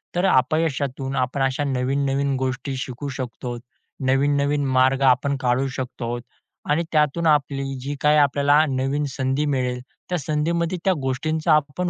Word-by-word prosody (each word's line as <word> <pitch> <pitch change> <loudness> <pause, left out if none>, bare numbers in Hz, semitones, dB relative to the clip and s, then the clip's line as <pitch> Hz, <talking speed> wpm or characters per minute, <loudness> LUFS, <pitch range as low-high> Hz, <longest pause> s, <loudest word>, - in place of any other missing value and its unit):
तर 175 - +2
अपयशातून 135 -3 +1
आपण 130 +2 -1
अशा 135 +2 0
नवीन-नवीन 135 +1 0
गोष्टी 130 +1 -2
शिकू 130 +2 -5
शकतो. 120 -1 -5 0.5
नवीन-नवीन 140 +2 +2
मार्ग 130 +1 +3
आपण 135 +2 +3
काढू 130 +2 +1
शकतो 120 -2 -4 0.5
आणि 155 +3 +2
त्यातून 155 +2 +2
आपली 140 -2 +2 0.2
जी 140 +2 -4
काही 150 0 +4
आपल्याला 145 +1 +4
नवीन 135 +2 -1
संधी 135 +2 -1
मिळेल, 125 -2 -1 0.3
त्या 180 - 0
संधीमध्ये 165 +4 -1
त्या 190 - +4
गोष्टींचा 155 +5 0
आपण 150 +4 0
140 Hz, 135 wpm, -23 LUFS, 130-150 Hz, 0.5 s, काही